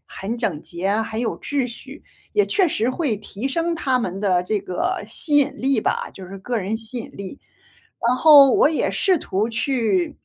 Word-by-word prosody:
很 210 +5 -5
整 175 -10 -2
洁 175 +2 -5
啊， 205 +3 +1
很 220 0 -5
有 240 - -2
秩 280 -3 -1
序， 270 +4 -11 0.3
也 415 -1 +2
确 380 -4 +2
实 230 -4 -1
会 260 -4 -1
提 210 +4 -5
升 335 +4 -1
他 265 -6 0
们 195 -5 -3
的 185 -3 +2
这 205 +2 -1
个 355 - -2
吸 295 -2 0
引 285 - +2
力 265 -3 +1
吧， - - -1
就 190 - -10
是 195 +2 -9
个 235 +5 -3
人 205 +2 -2
吸 225 +2 -5
引 230 - -7
力。 200 +7 -8 0.7
然 250 - +3
后 285 -3 +8
我 - - +5
也 315 - 0
试 375 -4 +2
图 210 -1 -2
去， 225 -6 0
235 Hz, 215 characters per minute, -21 LUFS, 200-280 Hz, 0.7 s, 后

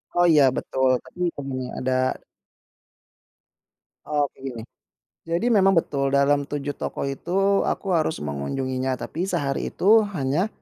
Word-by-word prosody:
Oh, 175 0 +4
ya, 155 -4 +6
betul. 130 0 +1
Tadi 180 -1 -3
temennya 130 -2 -5
ada 130 0 0 2.1
Oke, 145 -3 -2
gini, 130 -4 -6 0.7
jadi 170 +9 +1
memang 195 -3 +4
betul 140 -4 +1
dalam 140 0 +3
7 145 -1 -3
toko - - -3
itu 190 +8 +1
aku 195 - -2
harus 160 - 0
mengunjunginya, 130 - -2
tapi 170 +8 -4
sehari 145 -7 -1
itu 215 +4 +4 0.2
hanya, 145 +6 0
145 Hz, 125 wpm, -24 LUFS, 130-175 Hz, 2.1 s, ya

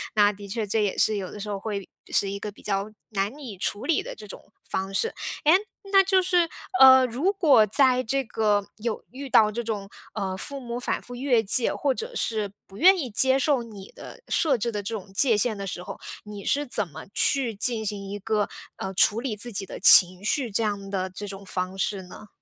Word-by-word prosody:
那 205 -1 +5
的 205 0 -11
确 215 +2 -3
这 210 +1 0
也 200 - -1
是 215 -1 +2
有 185 -2 -5
的 - - -9
时 210 +1 -6
候 200 - -3
会 200 -2 -5 0.2
是 200 - +2
一 200 - -5
个 210 - -6
比 205 - -18
较 200 0 -2 0.2
难 205 +6 -2
以 240 -9 -8
处 205 +4 -2
理 320 -1 +2
的 - - -8
这 210 - -12
种 200 - -13 0.2
方 190 +1 -3
式。 455 - -1 0.3
诶， 305 - +6 0.4
那 390 0 +6
就 380 0 +3
是 360 -2 +2 0.3
呃， 260 -1 +9
如 275 +12 0
果 300 - +5
在 255 +4 +3
这 270 +3 -1
个 210 -3 0
有 220 0 -4
遇 275 +2 -7
到 215 -3 +5
这 235 +3 -4
种， 210 -3 -4 0.2
呃， 195 -3 -3
父 280 +7 -5
母 240 -1 -5
反 - - -2
复 245 - -10
越 245 -2 +2
界， 230 +4 +2
或 280 -3 0
者 470 +2 -6
是 215 - -1 0.2
不 195 - -14
愿 375 - +7
意 280 -8 -3
接 260 +5 +3
受 275 -3 +1
你 205 -4 -11
的 - - -11
设 295 -5 +2
置 235 +2 -2
的 210 -2 -3
这 225 +3 -5
种 195 -2 -9
界 230 +2 +3
限 220 +1 +1
的 200 - -5
时 180 - -5
候， - - -7 0.3
你 205 -1 -9
是 290 +1 0
怎 210 -6 +2
么 145 - -11
去 265 -5 +1
进 220 +1 -1
行 200 -1 -4
一 205 - -4
个， 210 0 -1 0.3
呃， 190 0 -5
处 210 +4 +3
理 240 -5 -3
自 240 +3 -4
己 195 0 -3
的 - - -9
情 185 0 +8
绪 250 +2 0
这 200 - 0
样 200 -2 -3
的 190 -1 -2
这 185 +3 -8
种 195 0 -9
方 185 0 -4
式 195 0 -1
呢？ 195 +3 -13
215 Hz, 245 characters per minute, -25 LUFS, 200-255 Hz, 0.4 s, 呃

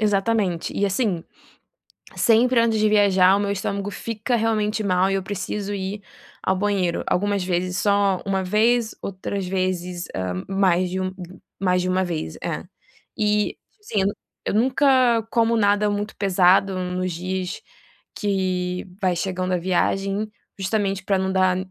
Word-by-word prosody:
Exatamente 205 -4 +1
e 200 - +1
assim, 195 -4 0 0.9
sempre 235 +2 +4
antes 230 -1 +2
de 215 0 +3
viajar 195 -3 +5
o - - -1
meu 200 0 0
estômago 200 0 -2
fica 230 +3 -2
realmente 215 -1 0
mal 185 0 +2
e - - 0
eu 195 -1 -1
preciso 205 +1 -4
ir 200 +1 -4 0.4
ao 190 - +1
banheiro, 195 -3 0
algumas 200 +2 +1
vezes 180 0 -1
só 200 -2 +2
uma 195 -1 0
vez, 220 +4 +2
outras 195 0 -4
vezes, 180 -1 -2
hã, 95 -1 -3
mais 185 -2 +2
de 190 +1 -3
uma 185 0 -2 0.5
mais 180 -1 +2
de 180 - -2
uma 185 +1 +1
vez 160 - -4
é, - - -3 0.5
e 210 -1 +1
tipo 420 - -39
assim 215 - -1
eu 190 - +2 0.4
eu - - -1
nunca 255 -1 +3
como 230 0 +3
nada 205 -1 +3
muito 205 +1 -3
pesado 190 0 +3
nos 180 0 -2
dias 185 +2 -4 0.5
que 185 -3 -1 0.2
vai 185 -2 +2
chegando 185 0 -2
a - - +2
viagem, 195 +3 0 0.3
justamente 195 -1 -1
para 195 -2 +2
não 190 0 -1
dar 185 -1 +3
195 Hz, 155 wpm, -23 LUFS, 185-210 Hz, 0.9 s, viajar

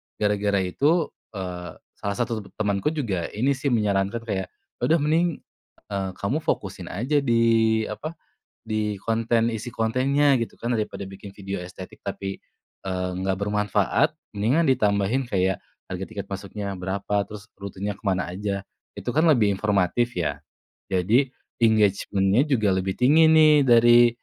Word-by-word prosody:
gara-gara 105 -2 +1
itu, 150 - +1 0.2
eee, 90 -3 -6 0.2
salah 100 0 -2
satu 115 -4 -2
temenku 100 +1 -1
juga 100 - -2
ini 130 +6 +2
sih 140 +1 -2
menyarankan 105 -1 +1
kayak, 95 -4 -3 0.3
"Udah 160 - +3
mending, 165 +1 +1 0.5
eee, 95 -1 -2
kamu 125 +11 -1
fokusin - - -3
aja 130 +10 0
di 115 -3 +3
apa, 155 +10 -6 0.5
di 105 -2 -1
konten, 115 +2 +1
isi 115 +2 -5
kontennya 135 +6 +2
gitu - - -7
kan 120 +1 -1
daripada 105 -3 -3
bikin 95 +1 -10
video 100 -2 -6
estetik 90 +1 -10
tapi, 95 0 -5 0.4
eee, 90 -1 -2
enggak 95 0 -1
bermanfaat 105 0 +1 0.2
mendingan 125 +11 +2
ditambahin 105 +3 +1
kayak 95 0 0 0.2
harga 95 0 -5
tiket 100 -2 -6
masuknya 100 +1 -5
berapa, 100 +2 -1
terus 105 -1 -9
rutenya 100 +1 -5
kemana 95 -3 -1
aja? 100 0 -3 0.3
Itu 120 - -4
kan 155 - +3
lebih 105 -8 +3
informatif 100 +2 0
ya," 85 - -2 0.5
jadi 105 +9 +3 0.3
engagement-nya 105 +1 +3
juga 110 -8 +2
lebih 95 0 -1
tinggi 150 +6 +6
nih 155 -1 +7
dari, 120 0 +7
105 Hz, 140 wpm, -24 LUFS, 95-120 Hz, 0.5 s, nih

